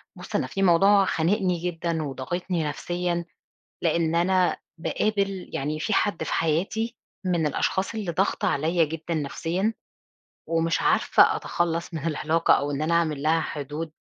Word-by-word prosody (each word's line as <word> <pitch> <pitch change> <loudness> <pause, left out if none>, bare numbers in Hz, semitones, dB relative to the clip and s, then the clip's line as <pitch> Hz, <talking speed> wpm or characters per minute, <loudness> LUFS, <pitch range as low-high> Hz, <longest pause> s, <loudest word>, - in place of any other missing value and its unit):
بُص، - - -8
أنا - - +1
في 195 - -3
موضوع 195 +3 +5
خانِقني 180 +1 +1
جدًا 170 -2 -2
وضاغطني 165 +5 -3
نفسيًا، 175 +3 -2 0.6
لإن 165 0 +1
أنا 180 +1 +2 0.2
باقابل 195 +1 -1
يعني 150 +3 -2
في 210 - -1
حد 205 -4 +1
في - - -3
حياتي 195 +9 0 0.3
من 170 -4 +1
الأشخاص 190 +7 -1
اللي 205 -5 -2
ضاغطة 195 +4 0
عليَّ 165 0 +2
جدًا 160 +2 -5
نفسيًا، 165 +7 -1 0.8
ومش 165 0 +1
عارفة - - +4
أتخلَّص 170 0 -2
من 160 0 -4
العلاقة، 160 +1 +2
أو 145 +1 0
إن 145 +1 -2
أنا 165 +2 +1
أعمل 155 -4 +1
لها 160 +2 +3
حدود. 155 +1 -5
170 Hz, 145 wpm, -25 LUFS, 160-185 Hz, 0.8 s, موضوع